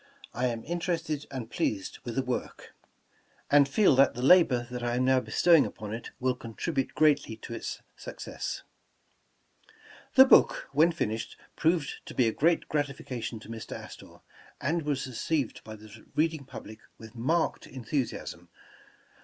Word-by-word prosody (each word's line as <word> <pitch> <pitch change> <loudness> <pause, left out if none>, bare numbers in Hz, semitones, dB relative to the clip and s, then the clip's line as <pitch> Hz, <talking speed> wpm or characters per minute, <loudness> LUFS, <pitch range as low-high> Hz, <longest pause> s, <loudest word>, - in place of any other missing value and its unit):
I 125 +1 0
am 115 -2 -3
interested 165 -3 -2
and 125 -4 -6
pleased 95 -3 -2
with 120 -2 -5
the 135 - +1
work, 125 -1 -5 0.8
and 140 -1 +6
feel 195 -2 +4
that 135 - +5
the 125 - -4
labor 135 -6 +5
that 125 -1 -4
I 120 0 -1
am 125 +1 +1
now 130 0 +4
bestowing 165 +4 +4
upon 105 -1 -6
it 115 - -6
will 130 0 +1
contribute 130 +4 -3
greatly 145 -7 +3
to 115 - -8
its - - -6
success." - - -6 1.5
The 265 0 +10
book, - - +5
when 155 +5 +4
finished, 115 -9 -3 0.2
proved 160 -2 0
to - - -8
be 125 - +3
a - - +2
great 165 +3 +2
gratifi 145 -3 -2
cation 120 -2 -5
to 110 - -13
Mr. 115 -1 -7
Astor, - - -12 0.4
and 165 +5 0
was 145 -3 -2
received 130 +1 -2
by 110 - -9
the 110 0 -14
reading 155 -2 0
public 110 -4 -10 0.2
with 110 -1 -12
marked 155 +8 0
enthusiasm. 130 +1 -4
130 Hz, 155 wpm, -29 LUFS, 115-155 Hz, 1.5 s, The